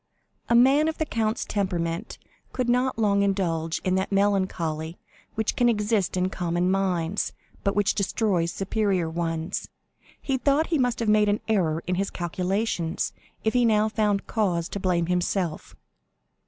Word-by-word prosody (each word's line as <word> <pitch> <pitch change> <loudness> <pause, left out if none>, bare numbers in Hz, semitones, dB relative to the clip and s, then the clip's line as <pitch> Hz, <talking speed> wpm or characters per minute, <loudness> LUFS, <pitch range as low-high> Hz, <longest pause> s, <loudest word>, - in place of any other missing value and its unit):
A 235 - +4
man 270 +6 +5
of 320 - -2
the 315 - 0
count's 225 -4 -1
temperament 175 -4 -2 0.4
could 250 -2 -1
not 250 +1 +1
long 200 -3 +2
indulge 170 -5 0
in 185 - +1
that 190 +2 -2
melancholy 185 -5 0 0.4
which 220 0 -1
can 245 -1 +3
exist 210 -4 0
in 185 +1 0
common 175 0 0
minds, 190 -1 0 0.3
but 200 - 0
which 205 0 +2
destroys 195 -4 0
superior 195 -3 0
ones. 165 +1 -3 0.5
He 265 -2 -1
thought 285 +5 +2
he 315 - +3
must 245 -2 +1
have 230 - -1
made 210 0 +4
an 205 - +1
error 170 -7 +1
in 180 - -1
his 195 - -2
calculations 180 0 -2 0.3
if 220 - +1
he 250 -1 +3
now 215 -1 +3
found 210 -2 0
cause 175 -6 0
to 200 - -4
blame 180 -3 +1
himself. 180 -1 -1
195 Hz, 155 wpm, -25 LUFS, 175-220 Hz, 0.5 s, man